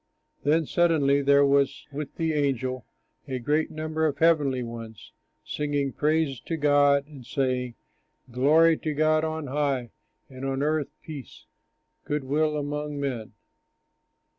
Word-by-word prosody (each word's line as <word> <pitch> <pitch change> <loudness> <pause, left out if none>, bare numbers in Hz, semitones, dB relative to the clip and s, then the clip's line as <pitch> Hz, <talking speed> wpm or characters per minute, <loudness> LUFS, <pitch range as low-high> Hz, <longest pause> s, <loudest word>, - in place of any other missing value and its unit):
Then 160 +2 +2
suddenly 145 -4 +3
there 140 0 +5
was 140 0 +2
with 145 +1 -6
the 160 -1 0
angel 130 -4 -1 0.4
a 130 - -3
great 150 +6 0
number 155 0 -1
of 145 - -2
the 160 - +2
heavenly 145 -6 +2
ones 115 -2 -9 0.3
singing 145 -2 -2
praise 150 -3 +1
to 165 - -4
God 145 -1 +4
and 145 -4 -12
saying: 125 -1 -1 0.6
"Glory 155 +6 +4
to 155 -2 -3
God 155 +1 +3
on 160 -1 -3
high, 135 -4 -1 0.4
And 130 0 -10
on 135 0 -1
earth 155 -1 0
peace, 145 -6 -10 0.6
good 150 -1 -2
will 150 +3 +1
among 145 0 -3
men." 125 -6 -4
145 Hz, 140 wpm, -26 LUFS, 135-155 Hz, 0.6 s, there